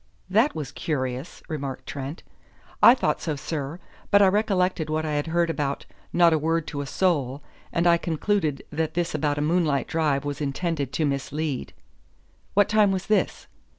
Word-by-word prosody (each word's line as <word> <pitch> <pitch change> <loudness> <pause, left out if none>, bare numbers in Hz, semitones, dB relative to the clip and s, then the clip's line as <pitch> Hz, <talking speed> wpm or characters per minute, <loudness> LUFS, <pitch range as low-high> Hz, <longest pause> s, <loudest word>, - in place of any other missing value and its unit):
"That 225 +9 +3
was 145 -3 -4
curious," 130 -1 -3
remarked 140 -5 -5
Trent. 140 +3 -6 0.6
"I 240 - +9
thought - - 0
so, 155 -3 -2
sir. 145 +1 -4 0.3
But 205 0 +6
I 195 - +6
recollected 185 -5 +1
what 155 +1 -1
I 155 - -2
had 145 +1 -1
heard 170 0 +1
about 140 -2 -2 0.3
'not 170 -1 +5
a 160 - +2
word 165 +1 0
to 145 -2 -4
a 140 - -5
soul,' 145 -6 0 0.3
and 170 - 0
I 170 -1 +6
concluded 165 -2 -1
that 160 +1 -2
this 175 0 0
about 150 -1 0
a - - 0
moonlight 155 -3 +1
drive 150 -3 0
was 145 +1 -4
intended 145 -1 -2
to 155 - +1
mislead." 140 0 -2 0.8
"What 205 0 +5
time 215 -2 +4
was 190 -1 -2
this?" 210 -4 0
155 Hz, 175 wpm, -25 LUFS, 145-175 Hz, 0.8 s, I